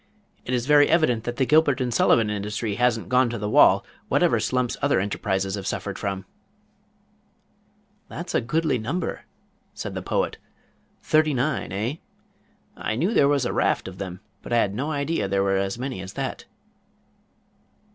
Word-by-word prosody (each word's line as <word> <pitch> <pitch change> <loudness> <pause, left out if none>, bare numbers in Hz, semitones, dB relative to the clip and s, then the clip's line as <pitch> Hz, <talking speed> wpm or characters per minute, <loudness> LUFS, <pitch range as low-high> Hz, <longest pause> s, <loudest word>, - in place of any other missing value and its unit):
It 125 - -1
is 120 -1 -1
very 145 0 +5
evident 155 -9 +2
that 120 - -3
the 130 - +1
Gilbert 150 -1 +3
and 125 -2 -1
Sullivan 115 -1 +3
industry 105 +1 -3
hasn't 120 0 +1
gone 125 -1 +3
to 120 - -4
the 105 -1 -3
wall - - +5 0.2
whatever - - +3
slumps 125 -2 0
other 145 -6 +2
enterprises 95 -1 -1
have 95 -1 -4
suffered 100 -1 -4
from." 95 -2 -3 1.8
"That - - -6
is - - -7
a - - +2
goodly 155 +1 0
number," 145 +11 -3 0.5
said - - -5
the - - -4
Poet. - - -1 0.6
"Thirty 155 -2 +3
nine, 135 -2 -1
eh? 110 - -2 0.8
I 110 - -3
knew 175 - 0
there 140 - +5
was 140 -3 +2
a - - -1
raft - - +1
of 95 0 -9
them, 95 -1 -6 0.2
but - - -10
I 120 - +3
had 100 -4 +2
no 135 +8 -3
idea 145 -4 -1
there 100 0 +1
were 95 0 +1
as 95 +2 -1
many 130 -5 -4
as 95 0 -8
that." - - -4
120 Hz, 175 wpm, -24 LUFS, 100-140 Hz, 1.8 s, very